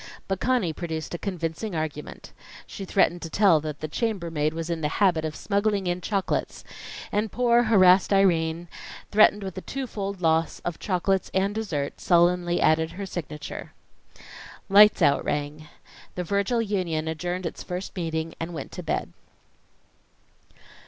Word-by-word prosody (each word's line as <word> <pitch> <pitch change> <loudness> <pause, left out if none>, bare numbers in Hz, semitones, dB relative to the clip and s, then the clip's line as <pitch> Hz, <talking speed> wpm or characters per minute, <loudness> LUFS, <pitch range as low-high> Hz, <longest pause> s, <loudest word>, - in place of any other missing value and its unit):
But 195 -1 -2
Conny 235 -9 +1
produced 160 -1 -5
a 175 - -4
convincing 175 +1 -4
argument. 155 -2 -5 0.3
She 195 - -8
threatened 175 -2 +2
to 165 - -6
tell 190 -2 +4
that 150 -1 -6
the 155 - -2
chambermaid 165 -6 -1
was 165 0 -5
in 170 -2 -3
the 150 - +1
habit 180 -6 +3
of 155 -1 -3
smuggling 200 -1 0
in 175 0 -1
chocolates 195 0 -2 0.5
and 210 0 0
poor 240 +1 +3
harassed 190 -4 +5
Irene, 170 -4 +2 0.4
threatened 210 -1 +5
with 190 -2 -5
the 185 - -6
two 270 +5 -4
fold 200 -4 -5
loss 165 -1 +1
of 175 -2 -3
chocolates 190 0 0
and 195 +2 +1
dessert, 170 -11 -3
sullenly 175 0 +3
added 160 +1 +2
her 200 +3 -5
signature. 150 -5 -7 1.0
"Lights 210 +2 +7
out" 140 - +4
rang. 150 +1 -3 0.5
The 180 - -2
Virgil 200 +6 0
Union 175 -7 -2
adjourned 175 +3 -3
its 165 - -5
first 180 +2 -6
meeting 165 -2 -3
and 165 +1 -5
went - - -6
to 180 - -6
bed. 165 - -3
180 Hz, 150 wpm, -25 LUFS, 160-200 Hz, 1.0 s, Lights